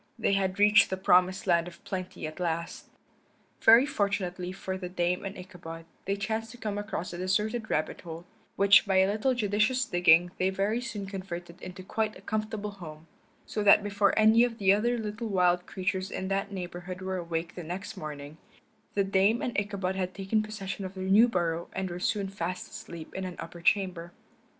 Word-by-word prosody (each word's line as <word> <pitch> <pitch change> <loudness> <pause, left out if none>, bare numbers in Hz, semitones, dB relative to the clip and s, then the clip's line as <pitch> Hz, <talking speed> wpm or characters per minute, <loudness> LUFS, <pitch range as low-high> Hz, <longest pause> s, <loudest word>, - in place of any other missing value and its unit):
They 220 -3 +1
had 190 -1 0
reached 210 +1 +6
the 190 - -2
promised 185 0 +3
land 170 -2 +3
of 170 -1 -12
plenty 185 -3 -5
at 155 +2 -7
last. 170 -1 -3 0.7
Very 230 +4 +8
fortunately 190 -7 -2
for 190 0 -5
the 185 -1 -5
Dame 180 0 0
and 195 0 -6
Ichabod 175 -3 -9 0.2
they 195 - 0
chanced 220 +2 -3
to 245 - -11
come 210 -3 -3
across 205 -4 -4
a 175 - -6
deserted 215 +5 -1
rabbit 155 - -1
hole, 165 0 -8 0.3
which 200 +1 +6
by 190 - +2
a 190 0 +5
little 235 +5 +1
judicious 220 +3 +1
digging 175 -1 +4
they 185 - +2
very 200 +5 0
soon 215 -6 -5
converted 180 -3 -7
into 185 0 -8
quite 215 +3 -2
a - - -15
comfortable 215 -1 -3
home; 160 -5 -10 0.4
so 215 - -3
that 205 0 +6
before 200 0 +1
any 220 +2 +6
of 240 -2 -1
the 195 -2 +4
other 240 +4 +1
little 220 +1 -4
wild 180 -3 +2
creatures 185 0 -2
in 190 - -4
that 195 +1 -1
neighborhood 180 0 -6
were 190 0 -2
awake 170 -1 -3
the 180 - -7
next 185 +6 -6
morning 150 -3 -7 0.6
the 200 - +3
Dame 195 +4 +2
and 240 - -2
Ichabod 200 -2 -1
had 185 -1 -3
taken 195 +3 0
possession 205 -2 -5
of 190 0 -6
their 190 - -5
new 200 +5 +6
burrow 170 -5 -1
and 190 -1 -3
were 175 - -5
soon 205 +1 0
fast 180 -2 -4
asleep 165 -2 -9
in 190 - -4
an 180 -1 -5
upper 170 +1 -8
chamber. 175 -2 +1
190 Hz, 195 wpm, -29 LUFS, 180-210 Hz, 0.7 s, Very